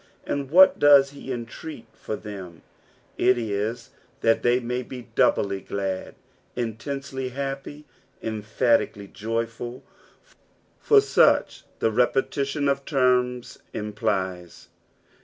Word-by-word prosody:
And 140 -2 -3
what 185 +5 +7
does 140 -2 +6
he 140 -1 -8
entreat 120 +2 -7
for 110 - -5
them? 95 -5 -9 0.6
it 125 - +4
is 110 +1 -3 0.3
that 115 0 +3
they 120 +1 +3
ma^ 125 +1 -4
be 125 -2 -7
doubt; - - +4
^lud, 100 -1 -3 0.4
intensely 130 +3 -4
happy, 140 +3 -5 0.3
emphatically 110 -1 0
joyful, 115 +3 -4 1.0
for 430 -2 +5
such 420 - +3
the 110 - +1
repetition 140 +4 0
of 140 0 0
teima 125 -3 +1
implies. 95 -4 -3
120 Hz, 100 wpm, -25 LUFS, 105-135 Hz, 1.0 s, what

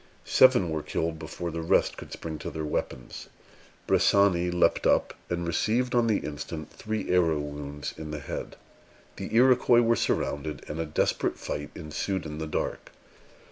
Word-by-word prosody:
Seven 125 -10 +5
were 80 -1 -1
killed 80 +1 -2
before 85 +2 -5
the 85 +1 -4
rest 80 - +2
could - - -10
spring 80 -2 -6
to - - -5
their 80 -1 -4
weapons. 65 -4 -4 0.6
Bressani 95 -3 +4
leaped 90 0 +2
up, - - +3 0.2
and 85 0 -2
received 115 +9 +1
on 120 -1 +3
the 110 -3 +2
instant 75 +1 -6
three 110 -3 -3
arrow 85 -4 +3
wounds 75 0 -5
in 80 -1 -7
the 75 - -4
head. 75 - -6 0.6
The - - -6
Iroquois 125 -1 +6
were 115 0 +3
surrounded, 75 -6 -1
and 75 +2 -5
a 80 - -2
desperate 75 - 0
fight 75 0 -4
ensued 85 +5 -3
in 75 0 -6
the 80 - -3
dark. - - -3
80 Hz, 165 wpm, -27 LUFS, 75-100 Hz, 0.6 s, Iroquois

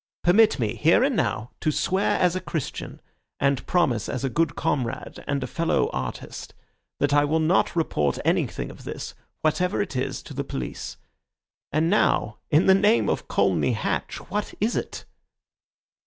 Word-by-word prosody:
Permit 215 +5 +5
me, 110 -6 -1
here 165 +10 +4
and 270 -1 +2
now, 115 - -1
to 155 - +1
swear 190 +6 +1
as 180 -1 +3
a 185 - -2
Christian, 160 -5 -5 0.4
and 140 -2 +1
promise 130 - +1
as 130 0 -3
a 135 - -1
good 165 +1 +1
comrade 125 -5 -2
and 140 -2 -1
a - - -1
fellow 165 -1 0
artist, 65 -1 -6 0.4
that 145 0 +2
I 145 0 +5
will 155 +2 +1
not 165 +3 +2
report 75 - 0
anything - - 0
of - - -13
this, - - -6 0.3
whatever 180 +4 +1
it 200 -8 -2
is, 130 - -2
to - - -10
the - - -2
police. 60 -2 -5 0.7
And 155 +3 +2
now, 170 - +2
in 155 +4 +4
the 190 - +7
name 210 +4 +3
of - - -2
Colney - - +2
Hatch, - - -2 0.2
what 210 0 -2
is 220 +4 +1
it?" - - -4
155 Hz, 170 wpm, -25 LUFS, 135-185 Hz, 0.7 s, the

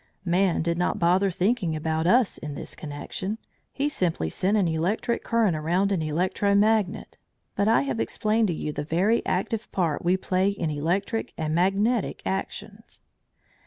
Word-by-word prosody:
Man 180 -1 +2
did 170 +1 -1
not 180 - 0
bother 180 +3 +3
thinking 185 -2 0
about 160 +1 -1
us 240 +2 +3
in 150 -1 -6
this - - -6
connection; 155 +8 -5 0.3
he 280 - -1
simply 170 - -1
sent 200 +4 +1
an 195 -4 +2
electric 175 +9 -1
current 225 -7 +2
around 175 +6 +1
an 185 -4 +1
electro 185 +6 0
magnet, 210 -2 +1 0.4
but 200 - +1
I 220 -10 +4
have 130 -4 -2
explained 215 - +1
to 175 - 0
you 150 -1 -4
the - - -3
very 185 +9 +1
active 225 0 -2
part 165 -6 -1
we 180 +2 +3
play 185 +1 +1
in 175 -6 -2
electric 175 +9 -1
and 155 -1 -2
magnetic 195 +7 +1
actions. 205 +3 -5
185 Hz, 165 wpm, -25 LUFS, 160-205 Hz, 0.4 s, I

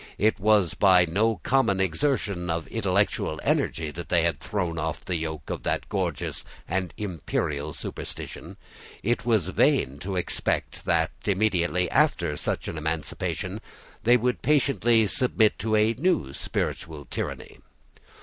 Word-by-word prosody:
It 105 +1 +2
was 105 -3 +3
by 90 -3 +5
no 110 +7 +1
common 115 -7 +2
exertion 95 - 0
of 80 0 -1
intellectual 80 - 0
energy 80 -2 0
that 85 +2 -8
they 85 -2 +3
had 85 -4 0
thrown 90 -5 -2
off 80 0 -3
the 90 - -1
yoke 80 -2 -4
of - - -3
that - - -1
gorgeous - - -2 0.2
and 90 0 -1
imperial 75 -6 -2
superstition; - - -7
and - - -11 0.5
it 120 +2 0
was 105 -7 +2
vain 70 -6 +2
to 95 +4 -4
expect 90 - -2
that, 80 -1 +2 0.2
immediately 90 -3 +2
after - - +2
such - - -2
an 80 - -4
emancipation, 80 0 -3 0.4
they 120 +2 +5
would 125 +1 -1
patiently 125 -6 +3
submit 110 -1 +2
to 110 +2 0
a 110 +1 +4
new 130 - 0
spiritual 75 0 -3
tyranny. - - -5
95 Hz, 140 wpm, -26 LUFS, 80-110 Hz, 0.5 s, by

